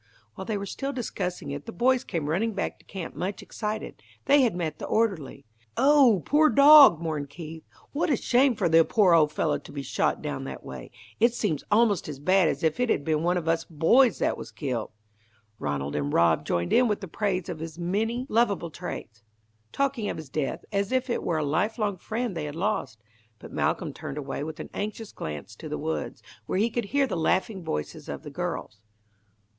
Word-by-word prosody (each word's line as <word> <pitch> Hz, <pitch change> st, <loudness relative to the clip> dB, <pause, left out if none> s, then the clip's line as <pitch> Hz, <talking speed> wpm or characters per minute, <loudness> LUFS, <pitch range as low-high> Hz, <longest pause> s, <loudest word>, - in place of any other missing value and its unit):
While 190 Hz, -, -7 dB
they 215 Hz, 0 st, -2 dB
were 200 Hz, -, -4 dB
still 275 Hz, +7 st, -4 dB
discussing 180 Hz, -, -4 dB
it 145 Hz, +1 st, -6 dB
the -, -, -4 dB
boys 255 Hz, +7 st, +2 dB
came 165 Hz, -6 st, -3 dB
running 205 Hz, +9 st, 0 dB
back 200 Hz, -, -3 dB
to -, -, -23 dB
camp 190 Hz, -4 st, -7 dB
much 195 Hz, +2 st, -4 dB
excited. 215 Hz, 0 st, -5 dB, 0.2 s
They 285 Hz, 0 st, +5 dB
had 240 Hz, -8 st, +2 dB
met 160 Hz, -4 st, -3 dB
the -, -, -5 dB
orderly. 180 Hz, -, -1 dB, 0.3 s
"Oh, 275 Hz, -5 st, +6 dB
the 185 Hz, -, -4 dB
poor 305 Hz, -, +4 dB
dog!" 280 Hz, -, +8 dB
mourned 155 Hz, -4 st, -3 dB
Keith. 160 Hz, +2 st, -9 dB, 0.3 s
"What 310 Hz, +4 st, 0 dB
a 285 Hz, -, +4 dB
shame 255 Hz, +2 st, +3 dB
for 200 Hz, -4 st, +1 dB
the 165 Hz, 0 st, +6 dB
poor 195 Hz, -1 st, +3 dB
old 155 Hz, -3 st, +5 dB
fellow 150 Hz, 0 st, 0 dB
to -, -, -13 dB
be 140 Hz, -1 st, -5 dB
shot -, -, 0 dB
down -, -, -4 dB
that -, -, -7 dB
way. 65 Hz, -2 st, -8 dB, 0.3 s
It 235 Hz, +2 st, +4 dB
seems 180 Hz, -, -1 dB
almost 210 Hz, -6 st, +3 dB
as 145 Hz, -, -6 dB
bad 185 Hz, +5 st, +3 dB
as 145 Hz, -1 st, -2 dB
if 160 Hz, +8 st, +1 dB
it 250 Hz, -1 st, +1 dB
had 140 Hz, -, +1 dB
been 155 Hz, -1 st, +1 dB
one 175 Hz, +2 st, +1 dB
of 165 Hz, -2 st, -4 dB
us 165 Hz, 0 st, +1 dB
boys 195 Hz, -, +4 dB
that -, -, 0 dB
was -, -, -7 dB
killed." 125 Hz, -7 st, -3 dB, 0.7 s
Ranald 70 Hz, 0 st, -3 dB
and 70 Hz, -1 st, -1 dB
Rob 85 Hz, -1 st, +3 dB
joined 85 Hz, 0 st, 0 dB
in 250 Hz, -, +5 dB
with 205 Hz, -5 st, -3 dB
praise 190 Hz, -3 st, -1 dB
of 170 Hz, -3 st, -5 dB
his 160 Hz, 0 st, -7 dB
many 220 Hz, +8 st, -1 dB
lovable 210 Hz, -, +1 dB
traits, 115 Hz, -, -7 dB, 0.5 s
talking 275 Hz, -6 st, -1 dB
of -, -, -4 dB
his 155 Hz, -4 st, -8 dB
death 140 Hz, -1 st, -3 dB
as 200 Hz, +1 st, -1 dB
if 260 Hz, -1 st, 0 dB
it -, -, -1 dB
were 165 Hz, -, -1 dB
a 155 Hz, -, 0 dB
lifelong 205 Hz, -, 0 dB
friend 225 Hz, +1 st, -3 dB
they 160 Hz, -2 st, -3 dB
had 145 Hz, 0 st, -6 dB
lost; 160 Hz, -, -2 dB, 0.3 s
but -, -, -12 dB
Malcolm -, -, -1 dB
turned 135 Hz, -, -7 dB
away 140 Hz, -1 st, -4 dB
with 155 Hz, 0 st, -6 dB
an -, -, -7 dB
anxious 215 Hz, +1 st, -5 dB
glance 75 Hz, +7 st, -7 dB
to 155 Hz, -, -9 dB
the 150 Hz, -, -3 dB
woods, 160 Hz, +2 st, -4 dB, 0.2 s
where -, -, -1 dB
he 225 Hz, +4 st, +2 dB
could 235 Hz, -1 st, -2 dB
hear 280 Hz, +6 st, +2 dB
the 260 Hz, -, -3 dB
laughing 185 Hz, +4 st, 0 dB
voices 75 Hz, -, -5 dB
of -, -, -6 dB
the -, -, -8 dB
girls. 105 Hz, -, -4 dB
180 Hz, 210 wpm, -26 LUFS, 150-225 Hz, 0.7 s, dog